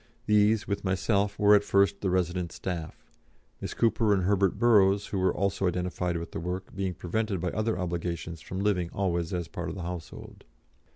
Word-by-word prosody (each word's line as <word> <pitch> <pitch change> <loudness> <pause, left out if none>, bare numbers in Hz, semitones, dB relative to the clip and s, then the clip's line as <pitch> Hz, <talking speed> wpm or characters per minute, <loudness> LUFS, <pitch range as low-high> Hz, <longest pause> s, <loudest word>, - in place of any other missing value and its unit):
These, 105 0 +3
with 100 - -2
myself, 100 +2 0
were 105 0 +5
at 105 -1 +5
first 100 0 +2
the 95 - 0
resident 90 -1 0
staff, 85 -4 -6 0.6
Miss - - -5
Cooper 110 -2 +3
and 95 - 0
Herbert 100 0 +2
Burrows, 100 -3 +4
who 100 - -3
were 95 0 +3
also 100 -1 0
identified 90 0 -1
with 85 0 -6
the - - -4
work, 90 +3 -5
being 95 -2 -2
prevented 100 +3 -2
by 90 +2 -1
other 110 +1 -1
obligations 85 -2 -4
from 95 +5 -5
living 95 -4 +1
always 85 -4 -1
as 90 -3 -2
part 85 +1 -5
of 80 - -6
the 95 - -6
household. 85 -1 -8
95 Hz, 185 wpm, -28 LUFS, 90-100 Hz, 0.6 s, were